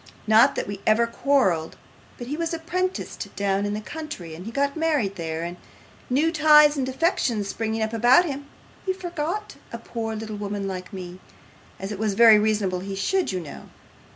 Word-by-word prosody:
Not 220 +6 +5
that - - -2
we 200 -1 -6
ever 220 +2 +4
quarrelled, 230 - +1 0.4
but 240 - -7
he 280 +5 -4
was 330 +1 -2
apprenticed 365 +3 -3
down 200 0 0
in 205 - -2
the 215 - -4
country, 295 - -7
and 175 +6 -9
he - - -5
got 280 +2 0
married 300 -12 0
there; 160 -2 -4
and 175 +1 -5 0.5
new 295 +6 +2
ties 300 -2 +6
and 265 -2 -1
affections 255 - 0
springing 220 0 -2
up 220 +1 -3
about 245 +10 +5
him, 285 -2 -5 0.4
he 380 - 0
forgot 355 +2 -4
a 235 - -5
poor 225 -1 -5
little 215 -1 -6
woman 200 -1 -4
like 185 -1 -6
me, 180 -2 -8 0.6
as 195 +2 -5
it 205 - -5
was 215 -2 0
very 225 -1 +8
reasonable 210 -4 0
he 195 +1 -5
should, 375 - 0
you 185 - -2
know. 150 - -10
225 Hz, 185 wpm, -24 LUFS, 200-300 Hz, 0.6 s, very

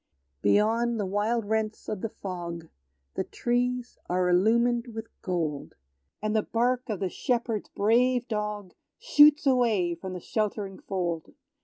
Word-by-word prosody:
Beyond 225 - +2
the 205 - 0
wide 210 +4 0
rents 220 0 -2
of 205 -3 -3
the 225 - -2
fog, 170 -5 -6 0.4
The - - -1
trees 245 0 -1
are 180 0 +1
illumined 235 +6 +3
with 225 0 -6
gold; 160 -6 -3 0.5
And 215 0 0
the 215 - +4
bark 245 +3 0
of 210 -4 -2
the 190 - +1
shepherd's 230 +1 -2
brave 245 +4 +2
dog 210 -4 -3 0.2
Shoots 300 -11 +6
away 230 -10 +3
from 185 +2 -7
the 180 - -5
sheltering 205 -1 -3
fold. 175 -4 -3
215 Hz, 140 wpm, -27 LUFS, 185-240 Hz, 0.5 s, Shoots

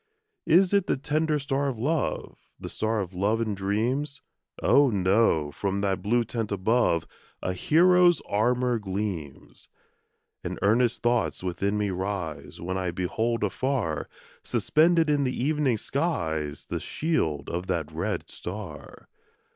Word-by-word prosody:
Is 180 +3 +5
it 200 -2 +3
the - - +1
tender 155 +2 0
star 140 0 -1
of 130 -4 -2
love? 145 +6 -2
The - - -6
star 110 0 -1
of 95 -1 -6
love 100 +5 +1
and 110 -3 -1
dreams? 115 +9 -1 0.4
Oh, 140 -1 +5
no! 95 -6 +2
from 100 +4 -2
that 95 -2 0
blue 120 +3 +2
tent 115 -1 -4
above, 100 -4 +2 0.4
A 90 - -1
hero's 175 - +5
armour 120 +3 +1
gleams. 95 -8 -5 0.7
And - - -4
earnest 115 +3 +2
thoughts 120 -5 +1
within 100 +3 -1
me 105 -1 0
rise, 95 -4 -4
When 95 +2 -3
I 90 -1 -1
behold 110 +7 -1
afar, 105 - -1 0.3
Suspended 165 +1 +3
in 145 -1 +2
the 130 -1 -2
evening 145 -5 +1
skies 80 - -2
The - - -3
shield 85 - -1
of 90 +2 -4
that 85 -4 -2
red 80 +2 -3
star. 90 -5 -8
110 Hz, 140 wpm, -26 LUFS, 95-140 Hz, 0.7 s, Is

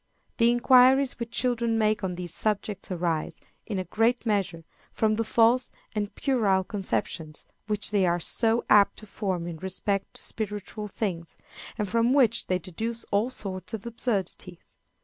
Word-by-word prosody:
The 230 -1 +5
inquiries 255 +2 +5
which 235 -1 -4
children 235 -1 0
make 215 -1 +1
on 180 -2 -2
these 175 -2 -6
subjects 210 0 -2
arise, 170 -4 -2 0.3
in 210 - -2
a 185 - -1
great 225 +7 +1
measure, 195 -6 0 0.3
from 215 -1 +1
the 225 - 0
false 235 +3 +3 0.2
and 205 -2 -3
puerile 210 -9 +2
conceptions 175 -5 -3 0.2
which 210 -1 -1
they 200 -3 +3
are 175 0 +1
so 225 +6 +1
apt 205 -1 +5
to 215 - -10
form 190 -4 -3
in 170 -2 -5
respect 190 +2 -3
to - - -8
spiritual 210 0 -4
things, 180 -5 -4 0.4
and 210 -3 -1
from 230 +4 +2
which 240 -5 +3
they 185 - +2
deduce 225 +6 -5
all 210 +4 +2
sorts 185 -5 -5
of 215 - -9
absurdities. 200 -6 -3
210 Hz, 160 wpm, -27 LUFS, 185-230 Hz, 0.4 s, The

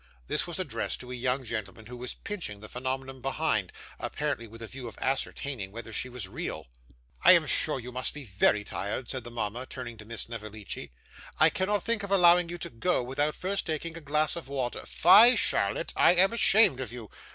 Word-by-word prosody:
This - - 0
was - - -4
addressed - - -2
to 125 0 -10
a - - -4
young 125 +2 -1
gentleman 110 -2 -6
who 125 +3 -9
was 125 0 -7
pinching 170 - -5
the 110 - -10
phenomenon 130 +1 -5
behind, 135 - 0 0.3
apparently 145 -6 -3
with 115 +1 -11
a - - -6
view 130 -1 -8
of 115 - -10
ascertaining 130 -5 -2
whether 115 +1 -8
she 125 - -1
was 125 -6 -5
real. - - -5 0.6
'I - - +9
am - - +4
sure - - +2
you 125 +1 -8
must 125 +1 -1
be 150 - -7
very 105 0 +2
tired,' 105 +4 -4
said 130 -3 -4
the 120 - -9
mama, 120 +2 -4
turning 120 -3 -7
to 105 - -11
Miss 115 +1 -3
Snevellicci. 110 - -7 0.5
'I - - +7
cannot 200 +2 -1
think 230 -2 0
of 200 - -6
allowing 175 -2 +5
you 175 - -4
to - - -7
go, 125 +5 0
without 145 +4 -1
first 195 +2 -2
taking 160 +1 -3
a 165 - -8
glass 150 +1 +1
of 170 - -7
wine. 130 -3 -2 0.2
Fie, 220 +9 +7
Charlotte, - - +1
I 175 - +5
am 190 +5 +5
ashamed 210 - +6
of 130 -5 -5
you! 120 -4 -9
130 Hz, 210 wpm, -28 LUFS, 115-160 Hz, 0.6 s, I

